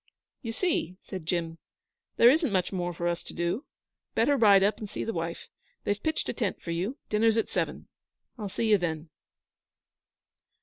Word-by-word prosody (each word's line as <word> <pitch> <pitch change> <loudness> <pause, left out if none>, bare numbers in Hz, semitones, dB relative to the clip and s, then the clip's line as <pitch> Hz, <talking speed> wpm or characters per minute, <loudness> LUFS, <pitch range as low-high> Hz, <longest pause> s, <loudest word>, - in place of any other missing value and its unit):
'You 230 - -4
see!' 225 - -1
said 185 -5 -7
Jim. 165 -2 -1 0.6
'There 240 - +8
isn't 310 -3 +2
much 185 0 0
more 175 -1 -1
for 170 0 -3
us 170 0 -1
to - - -10
do. 170 - -1 0.5
Better 285 +5 +4
ride 205 -6 +6
up 205 +2 +2
and 210 - -6
see - - -4
the 225 - -2
wife. 165 -1 -4 0.4
They've 205 0 -1
pitched 315 0 -1
a - - -1
tent 215 -6 -2
for 170 - -5
you. 190 - -2
Dinner's 220 +1 +3
at 225 - +1
seven. - - -2 0.5
I'll 210 -5 -5
see 225 +4 -1
you 210 -2 +5
then.' 160 -2 -3
200 Hz, 180 wpm, -28 LUFS, 170-225 Hz, 0.6 s, There